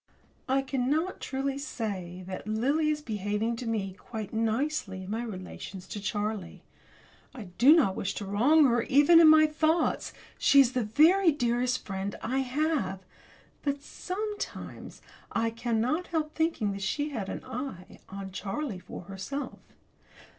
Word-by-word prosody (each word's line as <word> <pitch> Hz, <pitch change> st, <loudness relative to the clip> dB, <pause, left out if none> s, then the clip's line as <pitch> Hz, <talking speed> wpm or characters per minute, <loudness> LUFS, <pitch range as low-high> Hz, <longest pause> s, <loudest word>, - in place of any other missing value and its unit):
I 270 Hz, +1 st, +2 dB
cannot 280 Hz, +7 st, -1 dB
truly 270 Hz, +1 st, -2 dB
say 190 Hz, -, -5 dB
that 185 Hz, +2 st, -7 dB
Lily 275 Hz, +9 st, +1 dB
is 300 Hz, -1 st, -1 dB
behaving 210 Hz, +1 st, -1 dB
to 240 Hz, -, -5 dB
me 205 Hz, -4 st, -2 dB
quite 215 Hz, +1 st, -7 dB
nicely 225 Hz, -2 st, -1 dB
in 190 Hz, -, -7 dB
my 225 Hz, +2 st, -1 dB
relations 190 Hz, -3 st, -7 dB
with 205 Hz, -, -6 dB
Charlie. 205 Hz, -4 st, -3 dB, 0.7 s
I 215 Hz, -8 st, -8 dB
do 275 Hz, +7 st, +8 dB
not 235 Hz, -, +3 dB
wish 195 Hz, -, -3 dB
to 205 Hz, -, -4 dB
wrong 260 Hz, +11 st, +4 dB
her, 240 Hz, -2 st, +3 dB
even 290 Hz, +6 st, +6 dB
in 330 Hz, -, +8 dB
my 310 Hz, 0 st, +8 dB
thoughts 315 Hz, +2 st, +1 dB, 0.3 s
she 280 Hz, -, +6 dB
is 260 Hz, -3 st, +6 dB
the 255 Hz, -2 st, 0 dB
very 325 Hz, -, +5 dB
dearest 245 Hz, -2 st, 0 dB
friend 195 Hz, 0 st, -4 dB
I 260 Hz, +4 st, 0 dB
have! 265 Hz, -, -1 dB, 0.6 s
but, 280 Hz, 0 st, -2 dB
sometimes, 415 Hz, +6 st, -6 dB, 0.3 s
I 230 Hz, 0 st, +1 dB
cannot 240 Hz, +8 st, -1 dB
help 310 Hz, -2 st, -2 dB
thinking 320 Hz, -11 st, 0 dB
that 195 Hz, 0 st, -5 dB
she 290 Hz, +10 st, -1 dB
had 220 Hz, -9 st, -4 dB
an -, -, -6 dB
eye 225 Hz, -8 st, -7 dB
on 195 Hz, 0 st, -7 dB
Charlie 205 Hz, +3 st, -4 dB
for 180 Hz, -, -9 dB
herself. 195 Hz, +10 st, -6 dB
240 Hz, 150 wpm, -29 LUFS, 200-295 Hz, 0.7 s, do